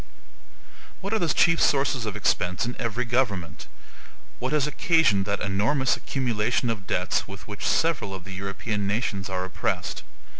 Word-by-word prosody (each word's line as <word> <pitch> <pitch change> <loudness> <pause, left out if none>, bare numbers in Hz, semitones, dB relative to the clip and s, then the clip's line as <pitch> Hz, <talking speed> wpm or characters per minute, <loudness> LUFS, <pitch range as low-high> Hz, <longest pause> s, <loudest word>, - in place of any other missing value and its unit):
What 195 +3 -3
are 220 - +2
the 170 - +1
chief 165 +1 +4
sources 135 -4 +2
of 105 - -3
expense 90 +2 +1
in 120 - -3
every 120 +1 -1
government? 110 -8 -1 0.7
What 130 - -2
has 150 -2 +3
occasioned 150 - +3
that 100 0 -1
enormous 110 +8 +2
accumulation 120 -2 0
of 100 -4 -5
debts 90 +2 0
with 100 +1 -10
which 105 -1 -4
several 160 -11 +1
of 95 - -8
the 95 +1 -8
European 100 +2 -3
nations 100 -3 -1
are 95 -1 -2
oppressed? 95 - -2
110 Hz, 155 wpm, -26 LUFS, 100-130 Hz, 0.7 s, chief